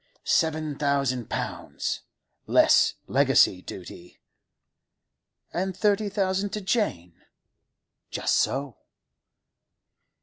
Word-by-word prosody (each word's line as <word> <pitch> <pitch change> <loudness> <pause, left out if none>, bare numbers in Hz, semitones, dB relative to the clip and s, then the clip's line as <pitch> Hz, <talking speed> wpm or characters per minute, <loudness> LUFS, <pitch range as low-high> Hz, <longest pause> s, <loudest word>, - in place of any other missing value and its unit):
'Seven 155 -2 +1
thousand 140 -5 0
pounds—less - - 0
legacy 90 - +3
duty.' 90 -1 -10 1.4
'And 190 +1 -2
thirty 210 -1 +2
thousand 195 0 0
to 210 - -3
Jane?' 140 - -2 0.9
'Just - - 0
so. 135 -2 0
155 Hz, 70 wpm, -26 LUFS, 125-195 Hz, 1.4 s, legacy